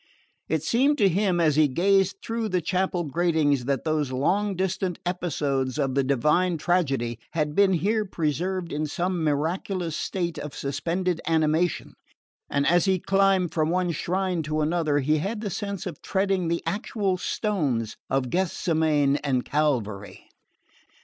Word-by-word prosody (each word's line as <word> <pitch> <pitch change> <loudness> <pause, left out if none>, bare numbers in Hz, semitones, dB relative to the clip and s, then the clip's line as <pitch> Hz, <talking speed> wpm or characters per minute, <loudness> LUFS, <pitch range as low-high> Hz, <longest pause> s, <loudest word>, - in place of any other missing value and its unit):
It 160 -1 0
seemed 270 - +2
to 205 - +4
him, 185 -1 +1
as 155 -3 +3
he 155 -1 +5
gazed 195 +7 +2
through 230 -1 -2
the 185 -1 +1
chapel 180 +1 -1
gratings, 155 -4 +1
that 140 0 -1
those 155 -4 0
long 195 +10 0
distant 185 -1 -1
episodes 145 -7 -1
of 135 -3 0
the 140 +1 +2
divine 150 +7 +2
tragedy 135 -9 0
had 150 -3 -1
been 195 +2 +4
here 210 +5 +1
preserved 175 0 -2
in 150 +1 -1
some 175 +3 -2
miraculous 165 +3 -1
state 175 -3 -3
of 150 - -7
suspended 165 +6 -2
animation, 160 +1 +1 0.6
and 140 0 +1
as 175 +2 +4
he 190 -1 +3
climbed 195 -1 +2
from 155 -1 +1
one 180 0 +1
shrine 180 +2 -1
to 155 0 -2
another 155 -1 +1
he 150 +3 +2
had 210 +7 -3
the 205 -3 -3
sense 200 0 -4
of 170 -6 -6
treading 190 -2 0
the 170 +1 -1
actual 205 -2 -1
stones 145 - -1
of 130 -2 0
Gethsemane 160 -5 +1
and 135 -4 -1
Calvary. 120 -10 -2
170 Hz, 150 wpm, -25 LUFS, 145-190 Hz, 0.6 s, he